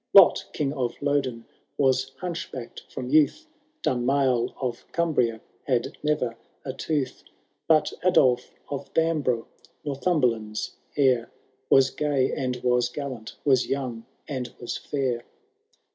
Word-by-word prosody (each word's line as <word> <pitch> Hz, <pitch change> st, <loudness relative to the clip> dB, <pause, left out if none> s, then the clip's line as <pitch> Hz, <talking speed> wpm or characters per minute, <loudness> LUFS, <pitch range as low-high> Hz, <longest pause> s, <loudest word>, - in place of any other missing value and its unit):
Lot, 195 Hz, -3 st, +8 dB
King 145 Hz, -2 st, -1 dB
of 125 Hz, -4 st, -1 dB
Lodon, 135 Hz, -5 st, 0 dB, 0.3 s
was 130 Hz, -1 st, +3 dB
hunchbacked 165 Hz, -9 st, -6 dB
ftom. 125 Hz, 0 st, -5 dB
youth; 155 Hz, -, +4 dB, 0.4 s
Dunmail 125 Hz, -1 st, +2 dB
of 125 Hz, -3 st, -3 dB
Cumbria 125 Hz, -10 st, +1 dB, 0.3 s
had 125 Hz, -4 st, 0 dB
neyer 150 Hz, -6 st, +1 dB, 0.3 s
a 130 Hz, -, -3 dB
tooth; 145 Hz, -2 st, -2 dB, 0.4 s
Bat 155 Hz, -1 st, +4 dB
Adolf 125 Hz, -9 st, +4 dB, 0.2 s
of 140 Hz, -, -5 dB
Bambrough, 150 Hz, -8 st, +2 dB, 0.4 s
Northumberland's 125 Hz, -8 st, 0 dB, 0.3 s
heir. 130 Hz, -4 st, +3 dB, 0.4 s
Was 135 Hz, 0 st, +6 dB
gay 145 Hz, -3 st, +1 dB
and 130 Hz, -2 st, -1 dB
Was 125 Hz, -1 st, +3 dB
gallant, 130 Hz, -5 st, -6 dB
was 130 Hz, -3 st, +4 dB
young 125 Hz, -4 st, -3 dB, 0.2 s
and 130 Hz, -4 st, -4 dB
was 120 Hz, -, -4 dB
fiur. 130 Hz, -5 st, -1 dB
130 Hz, 115 wpm, -26 LUFS, 125-145 Hz, 0.4 s, Lot